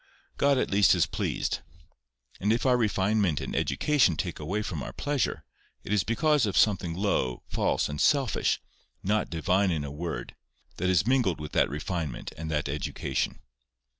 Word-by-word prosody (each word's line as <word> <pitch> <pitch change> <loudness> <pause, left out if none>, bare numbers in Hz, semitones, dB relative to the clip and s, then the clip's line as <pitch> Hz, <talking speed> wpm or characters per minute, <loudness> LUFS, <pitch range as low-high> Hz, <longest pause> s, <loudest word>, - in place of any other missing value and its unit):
God 140 -1 +3
at - - 0
least 100 -1 +5
is - - +3
pleased: - - -2 0.8
and 105 +3 +1
if 115 +4 +1
our 125 -1 +5
refinement 105 -6 +1
and - - -5
education 125 - +2
take - - -3
away 95 +8 -2
from 80 -7 -4
our - - -5
pleasure, 145 -5 -1 0.4
it 100 - -3
is 105 -4 +3
because 145 - +2
of 100 - -1
something 95 -5 +2
low, 85 -11 0
false, - - 0
and 75 0 -4
selfish, 140 -5 +2 0.4
not 105 +1 +1
divine 90 +4 +1
in 80 -4 -1
a 70 - -5
word, 75 -5 -5 0.4
that 90 +2 0
is 95 +2 +3
mingled 120 -10 +2
with 75 -1 -6
that - - +3
refinement 75 -2 -4
and 80 +1 -6
that 75 -2 -1
education. 75 +1 -2
95 Hz, 165 wpm, -28 LUFS, 80-110 Hz, 0.8 s, least